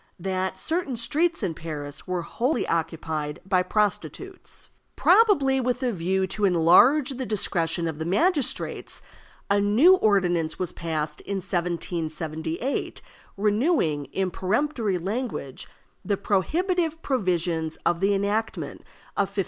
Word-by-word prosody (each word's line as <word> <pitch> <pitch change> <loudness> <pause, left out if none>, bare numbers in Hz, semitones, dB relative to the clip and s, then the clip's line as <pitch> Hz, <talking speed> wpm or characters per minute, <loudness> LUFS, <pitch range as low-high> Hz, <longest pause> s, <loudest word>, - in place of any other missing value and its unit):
That 190 +1 -2
certain 320 -6 -2
streets 320 +6 0
in 180 -4 0
Paris 150 -2 -7
were 180 -2 -2
wholly 245 - -1
occupied 160 -2 -2
by 185 -1 +3
prostitutes. 210 +1 -2 0.2
Probably 285 - +4
with 250 +1 -1
a 250 - +1
view 190 0 0
to 210 +2 -4
enlarge 195 - +5
the 260 0 -4
discretion 170 -5 0
of 160 -1 -4
the 160 - -3
magistrates, 290 - 0 0.4
a 200 0 +3
new 235 - +6
ordinance 175 - +2
was 180 -2 -2
passed 155 -2 -3
in 200 - -4
1778, 170 - -3 0.3
renewing, 205 - +1
in 190 +3 -2
peremptory 215 - 0
language, 195 - -4 0.4
the 200 -1 0
prohibitive 325 - 0
provisions 175 - 0
of 170 - +2
the 200 +2 +2
enactment 205 +3 -2 0.4
of 200 - +1
1560. 200 0 -5
195 Hz, 125 wpm, -25 LUFS, 165-250 Hz, 0.4 s, new